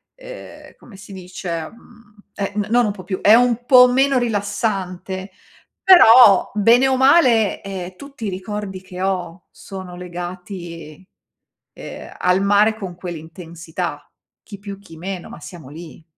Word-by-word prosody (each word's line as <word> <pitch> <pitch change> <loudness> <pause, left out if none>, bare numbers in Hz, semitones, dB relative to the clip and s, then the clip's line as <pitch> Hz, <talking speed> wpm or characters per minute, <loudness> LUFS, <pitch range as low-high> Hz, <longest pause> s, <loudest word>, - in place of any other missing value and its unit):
ehm, - - -12
come 215 -5 -16
si 195 +1 -13
dice, 180 -3 -6
mhmm, 230 -2 -21 0.2
è 200 -1 -3
n 210 -1 -2
non 240 +1 +3
un 210 - -1
po' 195 -2 -10
più, 185 +1 -5
è 210 - +6
un 245 0 +3
po' 250 -1 +7
meno 270 +1 +2
rilassante, 200 -4 -3 0.5
però 245 - +7
bene 230 +5 +4
o 265 - +1
male, 255 -6 +3
ehm, 185 -2 -7
tutti 280 -5 -10
i - - -1
ricordi 195 0 -6
che 185 -1 -10
ho 180 -2 -4
sono 185 -2 -10
legati, 175 -2 -9 0.7
ehm, - - -10
al 180 +1 +2
mare 205 +2 +3
con 190 -5 -7
quell'intensità. 170 -2 -7 0.4
Chi 205 - -11
più, 200 -1 -9
chi 195 -5 -15
meno 180 +1 -6
ma - - -11
siamo 160 -3 -12
lì. 160 +2 -12
195 Hz, 150 wpm, -19 LUFS, 180-225 Hz, 0.7 s, po